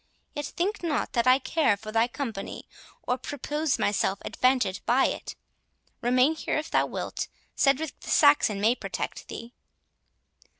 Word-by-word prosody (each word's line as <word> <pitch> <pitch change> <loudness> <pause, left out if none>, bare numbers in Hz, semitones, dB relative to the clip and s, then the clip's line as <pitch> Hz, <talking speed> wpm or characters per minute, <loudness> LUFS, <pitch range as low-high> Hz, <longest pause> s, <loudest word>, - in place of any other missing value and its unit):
Yet 290 -1 -4
think 385 +5 -2
not 330 -4 -1
that 235 0 +1
I 255 +1 +7
care 275 -5 +1
for 215 +1 -8
thy 225 +2 +3
company, 235 -6 -6 0.4
or 250 +1 -1
propose 290 +3 -2
myself 200 -1 +1
advantage 250 -7 +1
by 255 +3 +4
it; - - -3 0.7
remain 255 +5 +3
here 315 - -2
if 305 +1 -4
thou - - +3
wilt—Cedric 280 +1 -2
the - - -10
Saxon 285 -9 +5
may 220 +4 +4
protect - - -5
thee." 230 +2 -8
255 Hz, 140 wpm, -27 LUFS, 230-295 Hz, 0.7 s, I